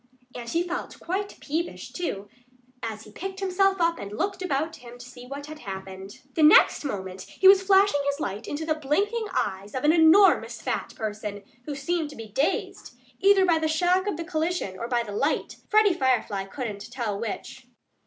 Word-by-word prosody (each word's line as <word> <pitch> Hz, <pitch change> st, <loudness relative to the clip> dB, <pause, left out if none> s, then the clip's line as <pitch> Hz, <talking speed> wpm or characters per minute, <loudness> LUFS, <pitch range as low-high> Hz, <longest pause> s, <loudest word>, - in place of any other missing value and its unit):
And 235 Hz, -1 st, -7 dB
he 335 Hz, +5 st, +1 dB
felt 355 Hz, 0 st, -5 dB
quite 395 Hz, +4 st, -4 dB
peevish, 325 Hz, +4 st, -4 dB
too, 205 Hz, -, -4 dB, 0.5 s
as 220 Hz, -1 st, -5 dB
he 215 Hz, -, -14 dB
picked 385 Hz, -, -6 dB
himself 390 Hz, 0 st, +2 dB
up 335 Hz, -1 st, +2 dB
and 200 Hz, -, -7 dB
looked 390 Hz, -, -2 dB
about 320 Hz, -2 st, -1 dB
him 245 Hz, -2 st, -12 dB
to 245 Hz, -, -11 dB
see 250 Hz, -1 st, -12 dB
what 280 Hz, +2 st, -7 dB
had 305 Hz, 0 st, -9 dB
happened. 190 Hz, -1 st, -8 dB
The 320 Hz, -, 0 dB
next 305 Hz, 0 st, +6 dB
moment 190 Hz, -8 st, -5 dB
he 380 Hz, -, +3 dB
was 385 Hz, 0 st, +8 dB
flashing 385 Hz, -5 st, +4 dB
his 280 Hz, +1 st, -1 dB
light 205 Hz, -5 st, -4 dB
into 305 Hz, +2 st, -4 dB
the 315 Hz, -, +1 dB
blinking 400 Hz, +10 st, -1 dB
eyes 200 Hz, -, -2 dB
of 260 Hz, -, -2 dB
an 300 Hz, +1 st, +5 dB
enormous 340 Hz, +4 st, +5 dB
fat -, -, -3 dB
person, 210 Hz, -1 st, -5 dB, 0.2 s
who 295 Hz, -, -4 dB
seemed 315 Hz, +3 st, -2 dB
to 295 Hz, -, -11 dB
be 225 Hz, -1 st, -9 dB
dazed, 270 Hz, +8 st, -2 dB, 0.2 s
either 390 Hz, -1 st, +5 dB
by 335 Hz, -3 st, +3 dB
the 315 Hz, -, 0 dB
shock 355 Hz, +5 st, +2 dB
of 405 Hz, -, -1 dB
the 335 Hz, -, -5 dB
collision 320 Hz, -, -2 dB
or 235 Hz, -, -3 dB
by 240 Hz, -1 st, +1 dB
the 210 Hz, -, -8 dB
light 280 Hz, +9 st, -1 dB
Freddie 425 Hz, -2 st, +5 dB
Firefly 245 Hz, -, 0 dB
couldn't 210 Hz, -1 st, -6 dB
tell 230 Hz, -5 st, -3 dB
which. 230 Hz, -, -6 dB
295 Hz, 195 wpm, -26 LUFS, 220-355 Hz, 0.5 s, was